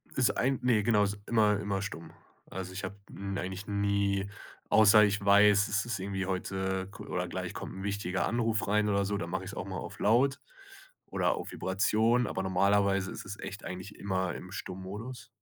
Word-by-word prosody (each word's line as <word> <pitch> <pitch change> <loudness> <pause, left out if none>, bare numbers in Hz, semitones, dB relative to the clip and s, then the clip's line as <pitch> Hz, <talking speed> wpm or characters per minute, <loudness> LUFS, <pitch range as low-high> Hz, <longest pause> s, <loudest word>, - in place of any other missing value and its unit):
Ist 130 -2 +2
ein 135 +1 +1
ne, 115 -4 +3
genau, 105 -2 +4
ist 100 0 -1
immer 105 -3 +3
immer 100 -2 -2
stumm. 80 -4 -6 0.4
Also 95 0 -5
ich 95 - -5
habe 95 +2 -4 0.2
n 100 0 -4
eigentlich 95 +2 -5
nie 100 -1 0 0.4
außer 110 0 +7
ich 105 -1 +1
weiß, 100 +1 +6
es 100 -1 0
ist 120 -4 -3
irgendwie 95 0 -3
heute 95 0 -2
ku 105 +1 -10
oder - - -2
gleich - - -4
kommt - - -7
'n 95 - -6
wichtiger 100 -2 -1
Anruf 115 -3 0
rein 105 +1 +2
oder 100 -1 +2
so, 100 0 -1
da - - -4
mache - - -3
ich's - - -7
auch - - -5
mal - - -5
auf - - -7
Laut 130 +6 +3 0.7
oder - - +1
auf - - -6
Vibration, 110 +6 +2
aber 95 - -2
normalerweise 100 +1 +2
ist - - -7
es 100 +1 -7
echt 100 - -7
eigentlich 95 +3 -7
immer 95 -3 -1
im 90 - -9
Stummodus. 100 +8 -7
100 Hz, 195 wpm, -30 LUFS, 95-105 Hz, 0.7 s, außer